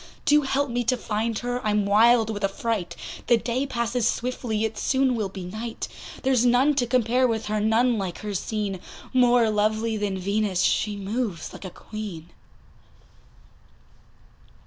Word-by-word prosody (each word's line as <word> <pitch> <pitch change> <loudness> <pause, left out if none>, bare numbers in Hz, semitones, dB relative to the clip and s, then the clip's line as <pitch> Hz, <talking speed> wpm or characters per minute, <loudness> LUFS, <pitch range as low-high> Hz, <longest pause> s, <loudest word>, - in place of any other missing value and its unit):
Do 295 +1 +5
help 275 -1 0
me 245 +1 0
to 255 +2 +2
find 225 0 -2
her, 245 +1 -3
I'm 210 -1 +1
wild 225 +2 +5
with 205 -1 -5
affright, 195 -1 -2 0.3
The 240 - +5
day 245 +4 -2
passes 235 -2 0
swiftly, 235 -3 -1
it 220 0 -3
soon 265 +2 +1
will 215 -4 -2
be 190 -1 -7
night; 220 +5 -5 0.4
There's 260 -3 +3
none 250 +4 +4
to 245 - +2
compare 250 +1 +2
with 225 -2 -2
her, 215 0 -1
none 225 +2 +2
like 185 -3 -4
her 210 -1 -4
seen, 200 0 -2 0.3
More 245 -3 +4
lovely 215 +1 +1
than 205 -2 -2
Venus, 200 0 0
she 210 -1 +1
moves 200 -2 -3
like - - -9
a - - -4
Queen. 190 -5 -8
225 Hz, 155 wpm, -25 LUFS, 210-245 Hz, 0.4 s, Do